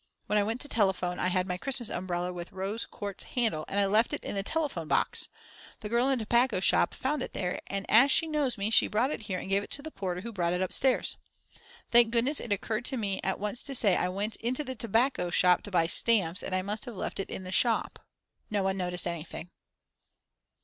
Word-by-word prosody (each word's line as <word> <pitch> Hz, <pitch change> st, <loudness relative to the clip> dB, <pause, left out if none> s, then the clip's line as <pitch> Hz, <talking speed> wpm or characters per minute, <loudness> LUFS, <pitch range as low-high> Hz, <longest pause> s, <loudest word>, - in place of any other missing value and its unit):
When 210 Hz, -, +1 dB
I -, -, +2 dB
went 225 Hz, +4 st, -2 dB
to -, -, -2 dB
telephone 190 Hz, -6 st, +1 dB
I -, -, 0 dB
had 185 Hz, 0 st, +1 dB
my 180 Hz, -1 st, -4 dB
Christmas 260 Hz, -1 st, +1 dB
umbrella 180 Hz, 0 st, -3 dB
with 175 Hz, 0 st, -7 dB
the -, -, -23 dB
rose 195 Hz, +4 st, -3 dB
quartz 200 Hz, -1 st, -6 dB
handle 220 Hz, -11 st, -1 dB
and 200 Hz, -, -1 dB
I 200 Hz, -, +3 dB
left 215 Hz, +4 st, +2 dB
it -, -, -3 dB
in -, -, -4 dB
the 200 Hz, -, -1 dB
telephone 280 Hz, -, -2 dB
box; -, -, +2 dB, 0.5 s
the 210 Hz, -, -5 dB
girl 240 Hz, +4 st, +2 dB
in 270 Hz, -, +2 dB
the 225 Hz, -, -4 dB
tobacco 240 Hz, -1 st, +2 dB
shop 190 Hz, -, +4 dB
found 290 Hz, +3 st, -2 dB
it -, -, -5 dB
there, 180 Hz, -2 st, -3 dB
and 195 Hz, 0 st, -4 dB
as 245 Hz, +6 st, +6 dB
she 325 Hz, -, +5 dB
knows 295 Hz, -6 st, -1 dB
me 205 Hz, +2 st, -2 dB
she -, -, +6 dB
brought 240 Hz, +6 st, 0 dB
it -, -, -4 dB
here 185 Hz, -, -1 dB
and -, -, -6 dB
gave 195 Hz, +1 st, +2 dB
it -, -, -9 dB
to 280 Hz, -, -4 dB
the 315 Hz, -, -7 dB
porter 180 Hz, -5 st, -4 dB
who 230 Hz, +3 st, -7 dB
brought 175 Hz, -3 st, 0 dB
it 180 Hz, -, -1 dB
upstairs. 255 Hz, +7 st, +3 dB, 0.7 s
Thank 235 Hz, -1 st, +6 dB
goodness 240 Hz, +6 st, +1 dB
it 230 Hz, -, -7 dB
occurred 215 Hz, +3 st, -2 dB
to 265 Hz, -, -1 dB
me 200 Hz, -4 st, -2 dB
at 190 Hz, -, -1 dB
once 210 Hz, +4 st, -1 dB
to 275 Hz, -, -3 dB
say 215 Hz, -5 st, +4 dB
that -, -, +2 dB
I 180 Hz, -, 0 dB
went 205 Hz, +4 st, -3 dB
into 250 Hz, +5 st, -2 dB
the 260 Hz, -2 st, -4 dB
tobacco 230 Hz, -3 st, 0 dB
shop 180 Hz, 0 st, +4 dB
to -, -, -7 dB
buy 175 Hz, -4 st, +2 dB
stamps 185 Hz, -1 st, +2 dB
and 185 Hz, -, -3 dB
I 185 Hz, -, 0 dB
must 210 Hz, +4 st, -4 dB
have 240 Hz, -4 st, -8 dB
left -, -, -4 dB
it 195 Hz, -, -4 dB
in 190 Hz, -, -6 dB
the 185 Hz, -, -7 dB
shop. 230 Hz, +3 st, +1 dB, 0.5 s
No 205 Hz, -2 st, 0 dB
one 190 Hz, 0 st, 0 dB
noticed 180 Hz, -1 st, -2 dB
anything. 170 Hz, 0 st, -5 dB
205 Hz, 245 wpm, -29 LUFS, 185-240 Hz, 0.7 s, as